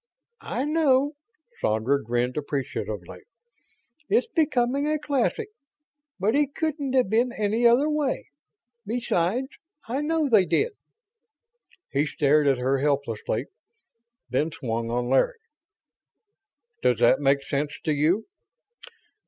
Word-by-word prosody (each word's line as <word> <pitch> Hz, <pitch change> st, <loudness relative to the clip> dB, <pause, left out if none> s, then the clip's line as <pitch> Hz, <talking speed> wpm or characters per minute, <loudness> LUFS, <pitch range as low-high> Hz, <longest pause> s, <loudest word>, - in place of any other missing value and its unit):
"I 260 Hz, -, -1 dB
know." 290 Hz, -3 st, +3 dB, 0.5 s
Sandra 115 Hz, +6 st, +1 dB
grinned 120 Hz, +2 st, -1 dB
appreciatively. 130 Hz, -, -4 dB, 0.9 s
"It's 445 Hz, +4 st, +3 dB
becoming 285 Hz, -, +1 dB
a 305 Hz, 0 st, +1 dB
classic. 295 Hz, -, -1 dB, 0.7 s
But 205 Hz, +4 st, +1 dB
it 285 Hz, -1 st, +1 dB
couldn't 300 Hz, -4 st, -2 dB
have 255 Hz, -4 st, +3 dB
been 235 Hz, +5 st, +2 dB
any 220 Hz, +3 st, +2 dB
other 245 Hz, +5 st, +4 dB
way. 300 Hz, -, -1 dB, 0.5 s
Besides, 230 Hz, +1 st, -1 dB, 0.4 s
I 260 Hz, +5 st, -1 dB
know 315 Hz, 0 st, +1 dB
they 210 Hz, -8 st, +4 dB
did." 450 Hz, -, +1 dB, 1.2 s
He 145 Hz, +2 st, +1 dB
stared 150 Hz, 0 st, +2 dB
at 135 Hz, -2 st, +3 dB
her 130 Hz, +2 st, +1 dB
helplessly, 140 Hz, -6 st, -1 dB, 0.8 s
then 140 Hz, +6 st, 0 dB
swung 115 Hz, -5 st, -3 dB
on 120 Hz, +1 st, -1 dB
Larry. 135 Hz, -, +2 dB, 1.4 s
"Does -, -, +3 dB
that -, -, +4 dB
make 140 Hz, -1 st, +2 dB
sense 145 Hz, +2 st, -2 dB
to 155 Hz, -, 0 dB
you?" 160 Hz, +9 st, +1 dB
210 Hz, 115 wpm, -25 LUFS, -, 1.4 s, other